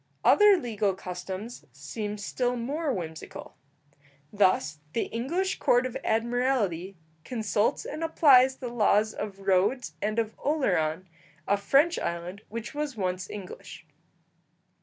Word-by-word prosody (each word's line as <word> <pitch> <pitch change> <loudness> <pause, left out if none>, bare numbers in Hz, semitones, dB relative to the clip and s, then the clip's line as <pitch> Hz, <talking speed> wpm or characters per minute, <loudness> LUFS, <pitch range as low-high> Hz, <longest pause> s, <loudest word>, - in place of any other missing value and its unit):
Other 415 -2 +7
legal 210 - -1
customs 190 +5 -7
seem 205 +10 -5
still 245 +4 -1
more 285 +6 -2
whimsical. 160 -7 -7 0.8
Thus, 155 -7 +2
the 230 - +1
English 335 +12 -2
Court 245 +1 +3
of 255 - -4
Admiralty 225 -6 0 0.3
consults 220 -1 0
and 310 +3 -5
applies 265 -5 +5
the 250 -2 -6
laws 215 -2 +2
of 205 -2 -5
Rhodes 195 +7 +1
and 215 +1 -1
of 220 -1 0
Oleron, 185 - 0 0.4
a 200 - +4
French 275 +12 +3
island 175 +4 -4
which 230 +1 -6
was 295 -4 -3
once 185 -1 -2
English. 190 -4 -9
220 Hz, 120 wpm, -27 LUFS, 190-255 Hz, 0.8 s, Other